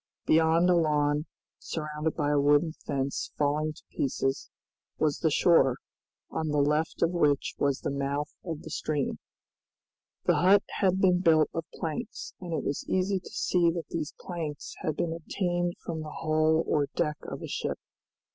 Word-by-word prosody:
Beyond 160 +2 +4
a 180 - +5
lawn, 150 -2 +2 0.3
surrounded 150 0 -3
by 145 -2 0
a 145 - +3
wooden 145 +3 +4
fence 140 -3 -3
falling 150 +1 +1
to - - -17
pieces, 135 +1 -1 0.5
was 150 -2 +1
the 160 - +2
shore, 140 -5 +4 0.5
on 160 - -2
the 150 -1 0
left 150 +3 +1
of 170 - +3
which 150 -5 +2
was 140 -1 +1
the - - -2
mouth 140 +1 -2
of 165 -4 -5
the 160 - -8
stream. 150 -3 -2 1.0
The - - +3
hut 195 +3 +5 0.2
had 190 -1 +3
been 180 -2 +4
built 160 -3 +4
of 165 0 -3
planks, 170 +9 -5
and 180 -2 -7
it 160 - -1
was 140 - -2
easy 190 +1 +1
to - - -12
see 175 -2 +2
that 165 -1 -4
these 155 -3 -4
planks 160 -5 -5
had 155 - -2
been 165 -1 0
obtained 175 +1 -1
from 160 -2 -3
the 155 - -6
hull 155 +1 +2
or 145 -2 +1
deck 150 0 0
of - - -7
a - - -4
ship. - - -2
155 Hz, 170 wpm, -28 LUFS, 145-170 Hz, 1.0 s, a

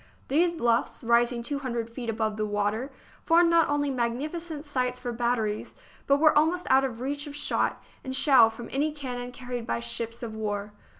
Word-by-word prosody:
These 335 +5 +3
bluffs, 235 -5 0
rising 235 +1 +2
two 285 +3 -2
hundred 240 -4 -3
feet 230 0 -6
above 220 -1 -1
the 215 0 -1
water, 210 +6 -1 0.3
formed 335 +1 +4
not 335 -1 +4
only 290 -1 +1
magnificent 290 +6 -3
sites 250 -3 -1
for 250 -1 -4
batteries, 230 -3 -1 0.3
but 280 - +5
were 310 +1 +5
almost 325 +4 +2
out 265 +1 +6
of 245 -3 -3
reach 285 +3 -3
of 290 - -8
shot 295 - 0 0.2
and 260 0 -3
shell 260 -5 +6
from 230 +1 -9
any 295 +3 0
cannon 250 -4 -5
carried 245 -2 -6
by - - 0
the - - -6
ships 230 - -3
of 225 -2 -5
war. 210 -1 -3
250 Hz, 190 wpm, -27 LUFS, 230-290 Hz, 0.3 s, out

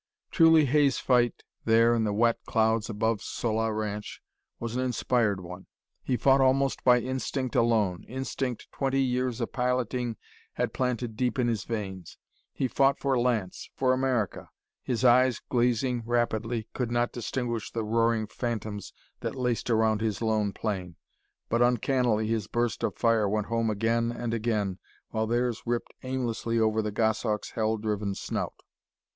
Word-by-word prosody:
Truly, 165 -2 +6
Hay's 140 0 +3
fight 120 -2 +2 0.2
there 115 +1 +4
in 115 -2 +1
the 105 - 0
wet 115 +3 +2
clouds 110 -1 +1
above 110 0 0
Sola 110 -1 -1
Ranch 105 -1 -4 0.4
was 115 0 -4
an 130 - 0
inspired 120 -5 +1
one. 90 +1 -9 0.3
He 125 - -1
fought 135 +1 +4
almost 135 +1 +2
by 125 -1 +6
instinct 130 0 -3
alone, 110 -6 +2
instinct 130 -1 -4
twenty 135 0 0
years 125 -1 -1
of 115 - -3
piloting 125 -2 -1 0.4
had - - -2
planted 125 -3 -2
deep 125 +1 0
in 125 -2 +2
his 110 -5 -1
veins. 95 -6 -5 0.3
He 130 - -1
fought 135 +3 +3
for 135 -2 +1
Lance 115 -7 -1
for 130 -1 +2
America. 130 -6 -1 0.3
His 125 0 -1
eyes, 125 -1 +5
glazing 120 0 +1
rapidly, 115 -1 -1
could 125 -3 -2
not 120 0 +1
distinguish 120 -1 -3
the 115 - -2
roaring 115 0 +1
phantoms 110 -3 -4 0.3
that - - -4
laced 125 -2 -1
around 110 -2 +2
his 110 -3 -1
lone 110 -3 +1
plane, 95 -5 -4 0.5
but 115 +1 +1
uncannily 120 -2 +2
his 110 -2 -1
bursts 120 0 -1
of - - -1
fire 115 -3 +2
went 105 0 0
home 115 0 0
again 115 +2 +1
and 120 -1 -3
again, 105 -5 -1 0.3
while 110 0 -1
theirs 120 0 0
ripped 120 0 -2
aimlessly 120 -3 -2
over 110 0 +2
the 105 -1 -3
Goshawk's 110 0 0
hell 110 0 0
driven 105 -2 -2
snout. - - -4
115 Hz, 155 wpm, -28 LUFS, 110-125 Hz, 0.5 s, Truly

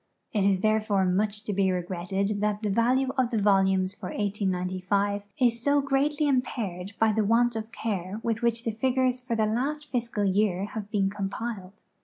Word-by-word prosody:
It 210 -3 +2
is 195 -2 +2
there 215 +1 +3
fore 200 -3 +1
much 205 +3 +1
to 210 - -3
be 190 -1 +2
regretted 185 +3 -2
that 210 0 -1
the 210 - 0
value 250 +5 +2
of 250 -2 +2
tlie 230 -3 0
volumes 190 -2 +3
for 185 -4 -7
1S!)5 200 0 -1
is 235 -2 +2
so 285 +3 +3
greatly 285 +2 +1
impaired 210 -8 -2
by 225 -1 +4
the 215 0 +1
want 235 +3 +3
of 220 0 -5
care 200 -2 -3
with 225 -1 -1
which 235 -1 +1
the 230 - -1
figures 255 +2 +1
for 250 -2 -3
the 220 -1 +2
last 285 +7 -2
fi.scal 220 -6 0
year 200 -2 +1
have 210 -1 -6
been 195 -2 +1
conq)iled. 200 0 -5
210 Hz, 185 wpm, -27 LUFS, 195-235 Hz, -, by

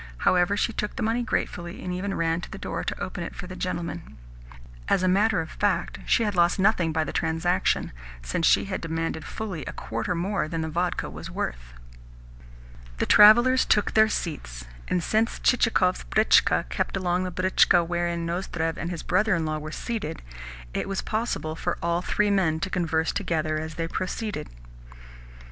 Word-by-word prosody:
However, 180 - +2
she 230 - 0
took 210 -1 -3
the 250 - -3
money 225 +2 +1
gratefully, 175 -5 -3
and 180 - -3
even 195 +2 -3
ran 165 0 0
to - - -8
the - - -8
door - - -4
to - - -4
open - - -4
it - - -7
for - - -7
the - - -8
gentlemen. 65 +2 -5 0.7
As 185 - +2
a - - +3
matter 200 0 +3
of 160 - -7
fact, 190 -4 -1
she 230 - +3
had 210 -2 0
lost 175 -1 +3
nothing 190 -4 +2
by 160 0 +1
the - - -5
transaction, 165 +2 0 0.3
since 110 - 0
she - - +4
had 190 -1 -4
demanded 165 -1 -3
fully 195 -8 -5
a - - -4
quarter 115 +11 -3
more 190 0 -1
than 165 +1 -3
the 160 - -3
vodka 175 +3 -1
was - - -8
worth. - - -5 1.2
The - - 0
travellers 240 +5 +7
then - - -10
took 210 - +3
their 220 0 +5
seats, 60 - -4 0.2
and 180 - 0
since 220 +2 +1
Chichikov's 220 -7 +2
britchka 215 +1 +3
kept - - -2
alongside 180 -1 -1
the 185 - -1
britchka 180 -2 +4
wherein 170 -1 -1
Nozdrev 170 -2 -2
and 170 - -3
his 175 -2 -5
brother 210 +2 +2
in 165 -1 -1
law 155 0 -2
were 155 +1 -7
seated, 205 -5 -4 0.5
it - - -2
was 195 - -2
possible 215 -8 -2
for 175 +1 -2
all 170 +1 +1
three 210 +2 +1
men 170 -6 +2
to 190 0 -2
converse 160 -2 0
together 155 -5 -1
as 160 0 -6
they 165 0 -2
proceeded. 190 - -4
175 Hz, 185 wpm, -26 LUFS, 160-200 Hz, 1.2 s, travellers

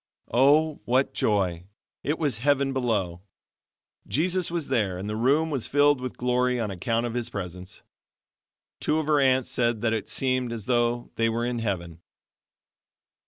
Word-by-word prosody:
Oh, 145 +5 +4
what 130 +3 +1
joy! 90 -5 0 0.4
it 150 +2 -1
was 145 -8 0
heaven 140 +1 +2
below. 105 -9 -1 0.9
Jesus 180 +4 +1
was 165 -5 -3
there 105 -8 0
and 95 +3 -5
the 105 - -3
room 140 +8 +2
was 135 -6 0
filled 145 -1 +3
with 130 -1 -5
glory 125 0 +1
on 110 -3 -2
account 115 +6 -1
of 120 - -3
of - - -7
His 120 -1 -2
presence. 90 -3 -7 1.0
Two 155 - 0
of 160 - -1
her 150 -1 +3
aunts 130 -1 +2
said 120 -3 0
that 115 -1 +1
it 110 -3 -3
seemed 130 -2 0
as 115 -4 -5
though 120 -1 0
they 115 0 +2
were 115 +1 -1
in 120 -1 -2
heaven. 85 -6 -4
120 Hz, 165 wpm, -26 LUFS, 110-135 Hz, 1.0 s, Oh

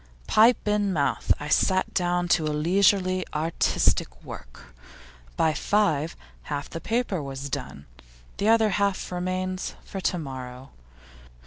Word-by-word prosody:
Pipe 225 +1 +4
in 210 -1 +1
mouth, 150 -6 0
I 150 - -5
sat 185 +4 +2
down 175 -1 +1
to 165 - +3
leisurely 185 +4 +2
artistic 150 - 0
work; - - -11 0.6
by 160 - +3
five, 165 -2 +1 0.3
half 145 -1 -3
the 165 - -7
paper 225 -6 -1
was 135 0 -6
done; 70 - -5 0.5
the 205 - +1
other 225 -1 +5
half 200 -1 0
remains 185 +1 -3
for 195 - -6
to 180 - 0
morrow. 130 -4 -7
180 Hz, 125 wpm, -26 LUFS, 145-195 Hz, 0.6 s, other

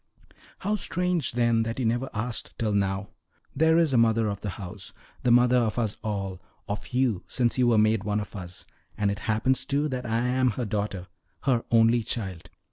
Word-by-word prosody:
"How 210 +2 0
strange, 180 -5 0
then, 120 -1 +2
that 115 +1 -3
you 130 - -1
never 120 +4 0
asked 110 +1 -4
till 110 -4 0
now! 100 0 0 0.5
There 160 +3 +4
is 165 -5 +3
a 120 - +5
mother 115 -1 +3
of 100 -1 -4
the 105 - -3
house 100 -1 -8 0.3
the 125 - +1
mother 120 +1 +5
of 115 -2 +1
us 110 -4 0
all, 100 -4 -3 0.3
of 105 0 -4
you 125 -7 0
since 125 0 0
you 125 - +4
were 115 -2 +4
made 110 -1 +3
one 105 0 0
of 105 0 -7
us; 90 -2 -8 0.3
and 105 -1 +1
it 100 - -4
happens, 110 +5 +2
too, 145 +2 0
that 125 -2 -4
I 115 +2 0
am 130 +1 +2
her 125 - -1
daughter 100 -3 -3 0.4
her 125 -4 +1
only 115 +1 +4
child. 100 -7 -4
115 Hz, 200 wpm, -26 LUFS, 105-125 Hz, 0.5 s, a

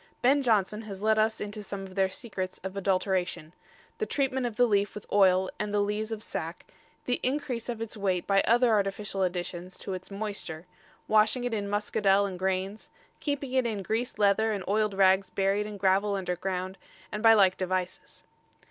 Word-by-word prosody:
Ben 275 +3 +5
Jonson 215 -4 +1
has 200 -2 -8
let 220 0 +3
us 220 0 +1
into 210 +1 -5
some 200 -1 -6
of 190 -1 -10
their 190 0 +2
secrets 190 -3 -5
of 190 0 -5
adulteration 185 -4 -1 0.5
the 435 - -1
treatment 265 -3 0
of 230 - -6
the 245 - +5
leaf 205 -3 +1
with 210 - -8
oil 190 -2 +4
and 210 -1 -2
the 205 - +1
lees 210 +2 -1
of 220 -1 -4
sack, - - -5 0.4
the 245 - 0
increase 255 -3 -2
of 235 -2 -3
its 225 - -7
weight 190 -4 -1
by 195 -1 +4
other 240 +1 +4
artificial 200 -1 0
additions 180 0 -3
to 195 - -5
its 185 0 -6
moisture, 200 -5 -5 0.4
washing 215 +3 +3
it 245 -1 -2
in 200 -2 -2
muscadel 205 -1 +2
and 185 -2 -5
grains, 190 +2 -2 0.3
keeping 280 -3 -3
it 260 -2 +2
in 210 -4 -3
greased 225 +4 -2
leather 210 +2 +3
and 200 -3 -2
oiled 210 0 +1
rags 190 0 +4
buried 200 +2 0
in 210 -1 -7
gravel 195 +1 +2
under 180 -2 -2
ground, 185 +1 -4 0.3
and 210 - -4
by 225 0 +7
like 190 -3 +5
devices. 185 -1 -4
205 Hz, 190 wpm, -28 LUFS, 190-220 Hz, 0.5 s, by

